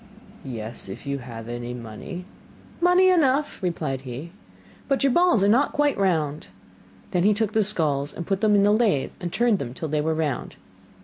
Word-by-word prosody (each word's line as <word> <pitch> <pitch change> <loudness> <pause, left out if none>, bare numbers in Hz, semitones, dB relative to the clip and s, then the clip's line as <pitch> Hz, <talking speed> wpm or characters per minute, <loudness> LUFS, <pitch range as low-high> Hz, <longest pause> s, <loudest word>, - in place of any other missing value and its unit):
'Yes, 115 -4 -7
if 95 - -8
you 140 0 -2
have 115 -3 -9
any 120 +1 -5
money.' 120 - -8 0.6
'Money 360 +2 +5
enough,' 295 -4 +2
replied 155 -7 -2
he, 135 +6 -7 0.6
'but 275 0 +1
your 275 - +4
balls 345 - +4
are - - +4
not 250 +7 +3
quite 290 -1 +2
round.' 155 -6 0 0.6
Then 180 - +1
he 205 +3 +4
took 215 -1 0
the 220 - +3
skulls 150 -8 0
and 170 - -6
put 195 -1 -1
them 215 -2 +4
in 200 - +4
the 205 +1 +4
lathe 215 - +2
and 175 -1 -4
turned 235 -2 +2
them 125 -2 -5
till 160 - -4
they 150 0 0
were 160 +1 0
round. 150 -5 -2
175 Hz, 190 wpm, -24 LUFS, 135-220 Hz, 0.6 s, Money